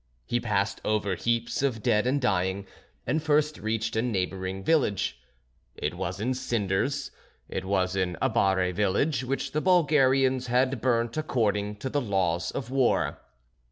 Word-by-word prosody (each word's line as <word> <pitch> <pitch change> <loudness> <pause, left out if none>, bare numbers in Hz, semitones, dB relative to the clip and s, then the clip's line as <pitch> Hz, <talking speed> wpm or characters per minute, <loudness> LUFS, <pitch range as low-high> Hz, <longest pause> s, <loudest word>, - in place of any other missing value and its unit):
He 120 - 0
passed 100 -3 -1
over 105 -2 0
heaps 115 - -1
of 125 -6 -1
dead 105 +3 +2
and 140 +3 +2
dying, 95 -5 0 0.4
and 155 +6 0
first 150 0 +1
reached 110 +1 -2
a 110 - +2
neighbouring 95 -4 -2
village; 105 - +1 0.5
it - - -2
was - - -4
in 125 +5 0
cinders, 120 +2 -1 0.4
it 95 - -4
was 95 -1 0
an 90 -3 -1
Abare 95 -2 +2
village 105 - +1
which 135 +2 -2
the 155 - -1
Bulgarians 135 -7 +3
had 125 0 +1
burnt 120 0 +1
according 105 -8 0
to 130 +6 -5
the 145 - +1
laws 95 -6 0
of 125 -2 -5
war. 135 -2 +1
115 Hz, 150 wpm, -27 LUFS, 95-130 Hz, 0.5 s, Bulgarians